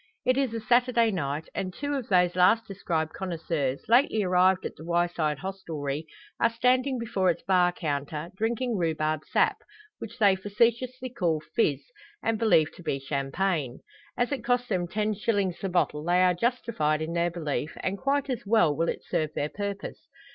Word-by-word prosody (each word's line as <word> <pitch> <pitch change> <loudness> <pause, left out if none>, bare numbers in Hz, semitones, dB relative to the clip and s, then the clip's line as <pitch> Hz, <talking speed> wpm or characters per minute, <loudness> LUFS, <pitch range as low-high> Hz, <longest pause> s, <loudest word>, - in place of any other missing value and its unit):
It 255 - +3
is 270 -3 +1
a - - -2
Saturday 240 0 +3
night, 150 -4 -3
and 185 -1 -3
two 285 +10 -4
of 270 -5 -3
those 180 -2 +3
last 200 +5 +4
described 170 -6 -2
connoisseurs, 165 -7 -3
lately 230 -2 +4
arrived 185 0 +3
at - - -5
the - - -11
Wyeside 170 -3 0
hostelry, 155 -4 -5 0.3
are 230 - +4
standing 255 +3 +2
before 200 -5 0
its 170 - -1
bar 180 -2 +3
counter, 150 0 -4
drinking 230 +2 -1
rhubarb 155 -2 0
sap, - - +3 0.4
which 230 +1 -8
they 200 -5 +5
facetiously 235 +6 0
call 175 - 0 0.2
"fizz," 145 - +2 0.4
and 225 -1 0
believe 190 -9 +3
to - - -11
be 140 - -1
champagne. 140 +1 -2 0.4
As 245 +2 0
it 265 -5 -2
costs 245 0 0
them 180 -4 0
ten 215 +3 -1
shillings 200 -3 -1
the 195 - -3
bottle 165 -4 0
they 175 +2 +3
are 180 -1 +4
justified 175 -8 0
in 165 +1 -4
their 170 0 +1
belief; 155 -4 -3
and 190 - -1
quite 280 +1 0
as 255 -4 -3
well 200 -8 +3
will 165 +3 0
it - - -4
serve 155 -3 -1
their 145 - -1
purpose. 200 - -6
185 Hz, 175 wpm, -27 LUFS, 160-230 Hz, 0.4 s, they